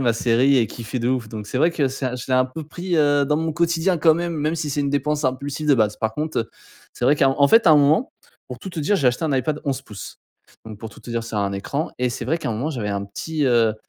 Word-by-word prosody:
ma 120 -3 +2
série 125 +4 +3
et 115 -3 +3
kiffer 120 +2 -5
de 120 - 0
ouf, 125 -4 -1
donc 105 -1 -7
c'est 130 - -2
vrai 165 +3 +3
que 140 -5 +1
c'est 130 -1 -3
je 120 - -7
l'ai 130 - +2
un 130 - +4
peu 130 +5 -7
pris, 175 +4 -4
heu, 145 -1 +3
dans 150 +1 +1
mon 160 0 -1
quotidien, 170 +2 +1
quand 160 0 +5
même. 170 0 -2
Même 155 +2 -1
si 155 -3 -3
c'est 145 - -1
une 140 -1 0
dépense 145 +1 -1
impulsive, 140 +4 -2
de 140 - +6
base. 105 -3 +1
Par 110 0 -2
contre, 155 +1 -2
heu, 115 - -3 0.4
c'est 120 - -4
vrai 145 +3 +4
qu'à 135 - +4
en 140 +1 +3
fait, 225 -3 +5
à - - +8
un - - +7
moment, 150 - +3 0.4
pour - - -7
tout 190 - -8
te 165 - -5
dire, 200 +8 +2
j'ai 140 - +1
acheté 125 +7 -1
un 150 - 0
Ipad 150 +3 -1
11 140 -1 -1
pouces, 105 -6 -10 0.5
donc 110 -2 -9
pour 110 0 -8
tout - - -16
te - - -14
dire, 115 -1 -2
c'est 115 -2 -6
un 100 -1 0
écran 140 +10 -3
et 125 -1 0
c'est 120 - -5
vrai, 160 +5 +1
qu'à 160 - -4
un - - -1
moment, 125 +8 -2
j'avais 115 -7 -4
un 100 0 -2
petit, 150 +9 -3
heu, 115 -3 +3
140 Hz, 300 wpm, -22 LUFS, 120-155 Hz, 0.5 s, à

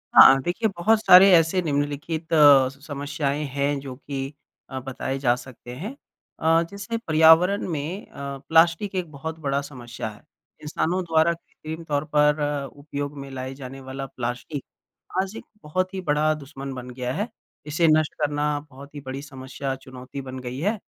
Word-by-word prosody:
हाँ 135 0 +9
देखिए 220 +6 0
बहुत 215 +6 +4
सारे 190 -1 +9
ऐसे 165 +2 +4
निम्नलिखित 150 +2 -2
अ, 145 -4 +7
समस्याएँ 145 +1 -3
हैं 140 0 0
जो 135 -2 -7
कि 135 0 -5 0.4
अ, 130 -1 -4
बताए 135 +1 -4
जा 125 -3 +3
सकते 125 -1 -10
हैं। 205 - -6 0.4
अ, 165 +1 +4
जैसे 200 +3 -4
पर्यावरण 165 +1 +5
में 165 +5 -4
अ, - - -24 0.4
प्लास्टिक 165 +4 +4
एक 175 -4 -2
बहुत 160 +3 -6
बड़ा 140 -2 0
समस्या 120 -5 -7
है। 105 - -14 0.4
इंसानों 170 +4 -1
द्वारा 165 0 +3
कृत्रिम 160 -1 -9
तौर 145 -2 -1
पर 150 0 +4
अ, 145 -1 -1
उपयोग 145 0 -6
में 140 0 -7
लाए 130 0 -5
जाने 135 0 -8
वाला 130 +1 -6
प्लास्टिक 125 +2 -5 0.6
आज 195 +2 -5
एक - - -8 0.2
बहुत 185 +5 -1
ही 190 - -3
बड़ा 155 +1 +3
दुश्मन 140 -2 -7
बन 125 -1 -7
गया 125 0 -4
है। 205 - -2 0.4
इसे 160 +2 +2
नष्ट 155 -1 +3
करना 145 0 0
बहुत 140 +3 -13
ही - - -5
बड़ी 130 +1 -5
समस्या, 135 -1 -5
चुनौती 130 +1 -9
बन 130 -1 -7
गई 125 +1 -6
है। 205 +5 0
145 Hz, 170 wpm, -24 LUFS, 135-165 Hz, 0.6 s, हाँ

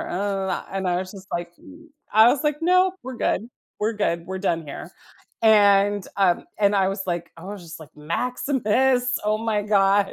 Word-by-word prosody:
And 195 0 -3
I 175 -1 +1
was 185 0 -5
just 195 -1 -12
like, 175 0 -4
uhm, 315 +3 -16 0.2
I 220 +2 +7
was 285 +4 +1
like, 295 0 0
"Nope, 365 +2 +3
we're 255 0 -7
good, 230 0 -1 0.3
we're 220 +2 0
good; 170 -5 -1
we're 190 +1 -5
done 165 -4 -1
here." 145 +4 -8 0.5
And, 205 -2 +4
um, 190 -3 +2
and 205 -1 +3
I 190 -1 +3
was 195 0 -3
like 175 -1 -3
I 165 - -12
was 200 -1 -7
just 165 -1 -10
like, 155 - -11
"Maximus. 250 - 0
Oh 215 0 +1
my 220 -2 -1
God." 200 -1 +2
200 Hz, 185 wpm, -23 LUFS, 185-230 Hz, 0.5 s, I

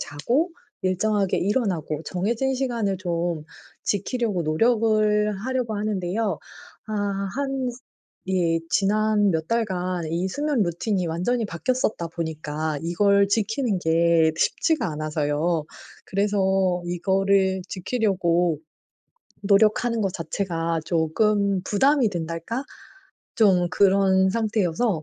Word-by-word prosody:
자고 245 - -1 0.3
일정하게 195 +1 +1
일어나고 180 - -1
정해진 230 +8 -1
시간을 235 -7 -1
좀 170 -3 -2 0.4
지키려고 205 -2 -1
노력을 215 +4 +2
하려고 250 -4 -1
하는데요. 205 -2 -1 0.5
아 215 - -4 0.4
한 270 -2 -1
스 245 +1 -12 0.5
예 175 -3 +1
지난 210 +1 +2
몇 160 -2 -2
달간 185 -6 -1
이 170 +3 -1
수면 290 +2 0
루틴이 180 +2 -1
완전히 185 +9 -1
바뀌었었다 200 0 -1
보니까 155 -2 -3
이걸 200 +4 +3
지키는 220 +1 0
게 165 -1 +3
쉽지가 295 - +1
않아서요. 155 +1 -1 0.4
그래서 190 -2 +1
이거를 190 +2 +1
지키려고 180 -6 0 0.8
노력하는 215 +3 +3
것 195 -3 0
자체가 165 -1 -2
조금 195 +4 +1
부담이 260 +6 +3
된달까? 170 - -4 0.7
좀 185 -5 +4
그런 190 -1 +4
상태여서 210 -4 0
195 Hz, 245 characters per minute, -24 LUFS, 170-215 Hz, 0.8 s, 좀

